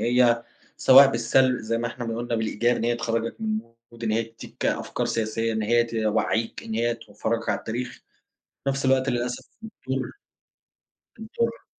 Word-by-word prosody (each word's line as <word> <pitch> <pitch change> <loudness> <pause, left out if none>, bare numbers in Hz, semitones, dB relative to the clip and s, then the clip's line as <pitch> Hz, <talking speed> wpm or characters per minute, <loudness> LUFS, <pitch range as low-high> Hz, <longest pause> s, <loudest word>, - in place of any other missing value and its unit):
هي 120 -1 +3 0.3
سواء 135 +1 +8
بالسلب 125 +2 +3
زي 115 +1 -1
ما 120 - -1
إحنا 120 +1 -5
ما 115 0 -3
قلنا 120 0 -2
بالإيجاب 115 +2 +1
إن - - -2
هي 120 0 +2
تخرجك 115 - -2
من 215 -1 0 0.3
mood، 115 0 -13
إن 110 - 0
هي 115 +1 +2
تدِّيك 115 0 -7
أفكار - - -1
سياسية، 115 0 -1
إن 110 0 -1
هي 120 +2 +3
توعِّيك، 110 0 -1
إن 110 - -5
هي 120 +1 +1
تفَرَجَك 115 0 -3
على - - +1
التاريخ، 120 +3 -4 0.8
في 140 - 0
نَفْس 135 0 -1
الوقت 130 0 +3
للأسف 120 0 -2 0.2
بتضر 135 - -4 1.1
بتضر. 230 +1 -3
120 Hz, 170 wpm, -25 LUFS, 115-130 Hz, 1.1 s, سواء